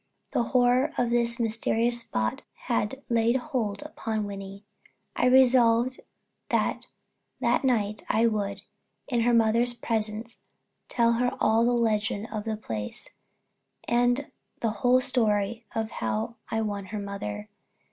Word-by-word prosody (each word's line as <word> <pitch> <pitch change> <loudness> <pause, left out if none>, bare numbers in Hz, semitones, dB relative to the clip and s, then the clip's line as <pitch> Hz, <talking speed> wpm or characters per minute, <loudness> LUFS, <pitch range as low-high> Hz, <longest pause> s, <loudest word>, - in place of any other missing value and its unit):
The - - +1
horror 250 +4 +3
of 240 -1 +1
this 235 0 +1
mysterious 230 +1 0
spot 110 - -2 0.2
had 245 +2 -1
laid 235 0 +2
hold 250 -4 -2
upon 225 -8 -3
Wynnie. 195 0 -7 0.5
I 250 - +2
resolved 250 -1 +4 0.5
that - - 0 0.5
that - - +2
night 215 -5 0
I 225 +1 +3
would, 200 -3 -1 0.4
in 240 -3 +1
her 240 +1 +3
mother's 230 +2 +3
presence, 225 0 -3 0.5
tell 235 -1 +3
her 245 +1 0
all 225 +2 +3
the 245 - +3
legend 220 -2 0
of 215 -1 -4
the 220 -1 -2
place, 110 - -5 0.8
and 245 +3 +2 0.3
the 225 - +1
whole 250 +1 +5
story 225 -3 0
of 220 0 -2
how 225 +2 -3
I 225 -1 0
won 205 -2 -3
her 210 +2 -5
mother. 105 - -5
230 Hz, 135 wpm, -27 LUFS, 210-245 Hz, 0.8 s, whole